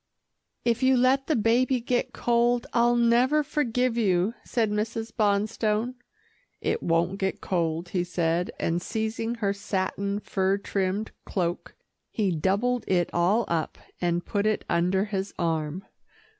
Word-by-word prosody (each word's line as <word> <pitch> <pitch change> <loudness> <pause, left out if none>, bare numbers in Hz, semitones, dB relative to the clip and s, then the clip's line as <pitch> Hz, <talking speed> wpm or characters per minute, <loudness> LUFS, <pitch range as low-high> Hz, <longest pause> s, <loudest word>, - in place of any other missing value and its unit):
"If 235 0 +1
you 260 0 +4
let 260 +2 +3
the 310 - +2
baby 245 +3 +2
get 245 +1 -1
cold, 240 0 +1
I'll 240 0 +4
never 240 +5 +3
forgive 250 -5 0
you," 195 -1 +2
said 225 -3 0
Mrs. 225 +2 -2
Bonstone. 215 +2 +1 0.7
"It - - -1
won't 170 +3 +1
get 190 0 -1
cold," 170 -1 -1
he 180 -2 0
said, 175 0 0
and 170 +1 0
seizing 225 +2 -2
her 205 -4 0
satin, 200 0 -2
fur 195 -1 0
trimmed 195 +1 -2
cloak, 175 -2 -3 0.3
he 205 -4 0
doubled 210 +9 +1
it 175 -2 +1
all 190 +7 +2
up, 165 -2 -2 0.2
and 175 -1 0
put 205 0 0
it 215 - 0
under 180 +3 +1
his 195 -2 -4
arm. 165 +1 -2
205 Hz, 140 wpm, -26 LUFS, 180-235 Hz, 0.7 s, you